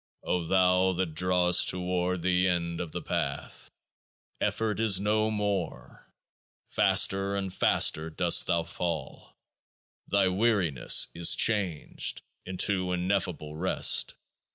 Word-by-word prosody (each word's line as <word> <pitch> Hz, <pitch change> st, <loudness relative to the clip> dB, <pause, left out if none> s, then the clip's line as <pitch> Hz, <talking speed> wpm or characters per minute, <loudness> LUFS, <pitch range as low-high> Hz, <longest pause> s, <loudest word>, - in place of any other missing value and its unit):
O 90 Hz, -2 st, -2 dB
thou 95 Hz, 0 st, +2 dB
that 90 Hz, -3 st, -3 dB
drawest 90 Hz, +1 st, +2 dB
toward 90 Hz, -1 st, -3 dB
the 90 Hz, 0 st, +1 dB
End 85 Hz, -2 st, -2 dB
of 85 Hz, -3 st, -7 dB
The -, -, -6 dB
Path, -, -, -5 dB, 0.7 s
effort 110 Hz, -2 st, -2 dB
is 105 Hz, -4 st, +3 dB
no 110 Hz, +2 st, 0 dB
more. 105 Hz, -5 st, -5 dB, 0.6 s
Faster 95 Hz, +1 st, +1 dB
and 95 Hz, -2 st, -4 dB
faster 80 Hz, +1 st, +1 dB
dost 80 Hz, -, +3 dB
thou 85 Hz, -1 st, 0 dB
fall; 80 Hz, -4 st, -6 dB, 0.7 s
thy 100 Hz, -1 st, +1 dB
weariness 95 Hz, -, +2 dB
is 85 Hz, 0 st, +4 dB
changed 95 Hz, -9 st, -1 dB, 0.2 s
into 95 Hz, 0 st, 0 dB
Ineffable 90 Hz, -4 st, -3 dB
Rest. 90 Hz, +4 st, +2 dB
90 Hz, 110 wpm, -27 LUFS, 85-100 Hz, 0.7 s, is